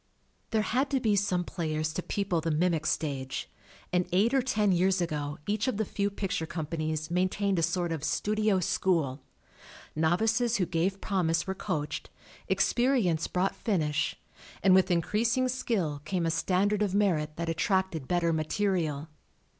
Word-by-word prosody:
There 220 Hz, -1 st, +1 dB
had 260 Hz, +6 st, 0 dB
to 270 Hz, -, +1 dB
be 220 Hz, -4 st, +2 dB
some 185 Hz, -3 st, +1 dB
players 155 Hz, -3 st, -2 dB
to 180 Hz, -, -2 dB
people 185 Hz, -3 st, -1 dB
the 165 Hz, -, -1 dB
mimic 160 Hz, 0 st, +1 dB
stage, 135 Hz, -4 st, -2 dB, 0.5 s
and 180 Hz, 0 st, +2 dB
eight 205 Hz, +7 st, +3 dB
or 270 Hz, -, +4 dB
ten 210 Hz, -5 st, +1 dB
years 185 Hz, +1 st, +3 dB
ago 150 Hz, -3 st, -2 dB
each 210 Hz, +2 st, 0 dB
of 255 Hz, -, 0 dB
the 220 Hz, -, 0 dB
few 200 Hz, +1 st, -1 dB
picture 195 Hz, -5 st, -3 dB
companies 155 Hz, -1 st, -3 dB
maintained 185 Hz, +1 st, +1 dB
a -, -, +1 dB
sort 175 Hz, +1 st, 0 dB
of 160 Hz, -3 st, -3 dB
studio 210 Hz, +5 st, +1 dB
school. 160 Hz, -7 st, 0 dB, 0.7 s
Novices 220 Hz, +9 st, +2 dB
who 185 Hz, -, +1 dB
gave 180 Hz, +3 st, -1 dB
promise 170 Hz, -4 st, 0 dB
were 190 Hz, -, -2 dB
coached, 150 Hz, -5 st, -3 dB, 0.4 s
experience 240 Hz, -, +2 dB
brought 185 Hz, +2 st, 0 dB
finish, 155 Hz, -9 st, -1 dB, 0.4 s
and 190 Hz, -, +6 dB
with 190 Hz, 0 st, +5 dB
in 170 Hz, -2 st, +2 dB
creasing 235 Hz, +6 st, +1 dB
skill 200 Hz, -, -1 dB
came 175 Hz, +2 st, -1 dB
a 165 Hz, -, +1 dB
standard 200 Hz, +5 st, +1 dB
of 200 Hz, -2 st, +1 dB
merit 160 Hz, -7 st, +1 dB
that 170 Hz, 0 st, -3 dB
attracted 165 Hz, -2 st, 0 dB
better 170 Hz, -2 st, +1 dB
material. 160 Hz, -2 st, -1 dB
180 Hz, 160 wpm, -29 LUFS, 160-205 Hz, 0.7 s, and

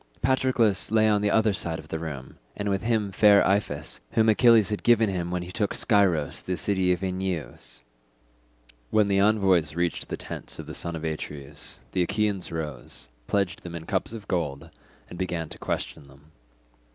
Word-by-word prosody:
Patroclus 125 Hz, -5 st, +2 dB
lay 110 Hz, 0 st, +4 dB
on 105 Hz, -1 st, +3 dB
the 105 Hz, -, +2 dB
other 110 Hz, 0 st, +3 dB
side 85 Hz, -3 st, -2 dB
of 80 Hz, -1 st, -12 dB
the 80 Hz, -, -3 dB
room, 70 Hz, -6 st, -7 dB, 0.2 s
and 105 Hz, 0 st, -2 dB
with 95 Hz, -1 st, 0 dB
him 110 Hz, -3 st, 0 dB
fair 100 Hz, 0 st, +5 dB
Iphis 95 Hz, -7 st, -1 dB
whom 110 Hz, 0 st, +4 dB
Achilles 110 Hz, -2 st, +5 dB
had 105 Hz, -, -2 dB
given 115 Hz, -3 st, +4 dB
him 90 Hz, -2 st, -3 dB
when 90 Hz, 0 st, -2 dB
he 90 Hz, -, -8 dB
took 105 Hz, +1 st, -1 dB
Scyros 95 Hz, -, +2 dB
the 90 Hz, -1 st, -3 dB
city 95 Hz, -1 st, +1 dB
of 90 Hz, +2 st, -1 dB
Enyeus. 90 Hz, -8 st, -4 dB, 1.1 s
When 105 Hz, -2 st, +3 dB
the 100 Hz, 0 st, +3 dB
envoys 95 Hz, -7 st, +3 dB
reached 85 Hz, 0 st, -1 dB
the -, -, -3 dB
tents -, -, -7 dB
of -, -, -7 dB
the -, -, -8 dB
son 85 Hz, -1 st, -3 dB
of 80 Hz, -, -6 dB
Atreus, 75 Hz, -3 st, -6 dB
the 95 Hz, -, 0 dB
Achaeans 100 Hz, 0 st, -1 dB
rose, 75 Hz, -7 st, -6 dB, 0.2 s
pledged 95 Hz, -3 st, 0 dB
them 85 Hz, -1 st, -8 dB
in 80 Hz, -1 st, -7 dB
cups 95 Hz, +2 st, -1 dB
of 110 Hz, -4 st, -9 dB
gold, 80 Hz, -3 st, -3 dB, 0.4 s
and 90 Hz, -, -10 dB
began 85 Hz, -4 st, -3 dB
to -, -, -10 dB
question 70 Hz, -, -4 dB
them. 70 Hz, +3 st, -20 dB
95 Hz, 185 wpm, -26 LUFS, 80-105 Hz, 1.1 s, fair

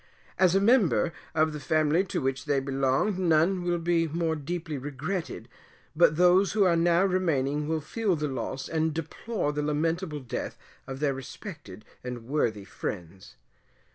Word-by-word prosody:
As 185 Hz, -1 st, +5 dB
a -, -, +5 dB
member, 200 Hz, -6 st, +3 dB, 0.2 s
of 155 Hz, 0 st, +2 dB
the 150 Hz, -, -5 dB
family 155 Hz, +4 st, +2 dB
to 190 Hz, -, -2 dB
which 135 Hz, 0 st, -1 dB
they 145 Hz, -2 st, +2 dB
belonged, 135 Hz, +8 st, 0 dB
none 175 Hz, +1 st, +3 dB
will 175 Hz, 0 st, 0 dB
be 165 Hz, 0 st, +1 dB
more 160 Hz, +1 st, -1 dB
deeply 160 Hz, +1 st, -4 dB
regretted, 145 Hz, +7 st, -4 dB, 0.5 s
but 160 Hz, -1 st, +5 dB
those 180 Hz, +3 st, +4 dB
who 210 Hz, -2 st, +4 dB
are 180 Hz, -3 st, +4 dB
now 170 Hz, +2 st, +3 dB
remaining 150 Hz, -6 st, 0 dB
will 160 Hz, 0 st, -1 dB
feel 200 Hz, +5 st, -1 dB
the 150 Hz, -1 st, -2 dB
loss 130 Hz, 0 st, -4 dB
and 160 Hz, -1 st, 0 dB
deplore 165 Hz, +1 st, -3 dB
the 150 Hz, -, -1 dB
lamentable 155 Hz, +2 st, -1 dB
death 125 Hz, -, -5 dB, 0.3 s
of 135 Hz, +1 st, -6 dB
their 145 Hz, -2 st, +2 dB
respected 135 Hz, -, -9 dB, 0.2 s
and 125 Hz, -2 st, -6 dB
worthy 115 Hz, -7 st, -1 dB
friends. 95 Hz, -1 st, -7 dB
155 Hz, 160 wpm, -28 LUFS, 140-175 Hz, 0.5 s, As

